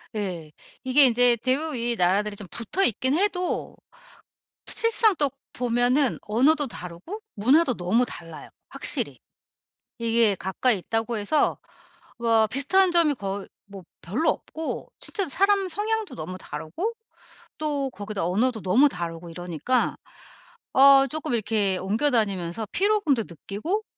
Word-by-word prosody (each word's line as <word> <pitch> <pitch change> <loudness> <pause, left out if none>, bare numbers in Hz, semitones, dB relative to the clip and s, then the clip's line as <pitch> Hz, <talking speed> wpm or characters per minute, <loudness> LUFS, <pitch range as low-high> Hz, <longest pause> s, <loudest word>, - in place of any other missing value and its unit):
예. 175 -7 -4 0.3
이게 265 +2 +5
인제 245 0 +4
대부분 280 +6 -1
이 235 0 -1
나라들이 200 +3 +1
좀 200 -2 -10
붙어 235 - -2
있긴 260 +6 +1
해도 365 -2 -1 0.9
실상 450 -2 +3
또 285 -2 +1 0.2
보면은 245 +3 +1
언어도 280 +7 +2
다르고 180 - -8
문화도 255 +6 +3
너무 210 +8 +1
달라요 165 -6 -9 0.2
확실히. - - -2 0.8
이게 230 -3 +2
가까이 200 +5 +1
있다고 225 +4 -2
해서 210 +9 +1 0.6
뭐 225 -2 +3
비슷한 350 - +2
점이 330 -4 +3
거의 195 -2 -5 0.2
뭐 195 -2 -11 0.2
별로 230 - 0
없고 320 0 -4
진짜 395 -5 -1
사람 395 +4 +2
성향도 435 +3 -2
너무 180 +4 -6
다르고 175 - -5 0.7
또 285 -3 -1
거기다 205 -4 -4
언어도 220 +5 0
너무 245 +11 +4
다르고 170 -2 -6
이러니까 175 - -1 0.8
어 275 0 +7
쪼끔 300 -2 -4
이렇게 210 -4 +1
옮겨 215 +11 +1
다니면서 200 -3 -1
피로감도 385 - +2
느끼고 215 - -4
235 Hz, 285 characters per minute, -25 LUFS, 195-300 Hz, 0.9 s, 어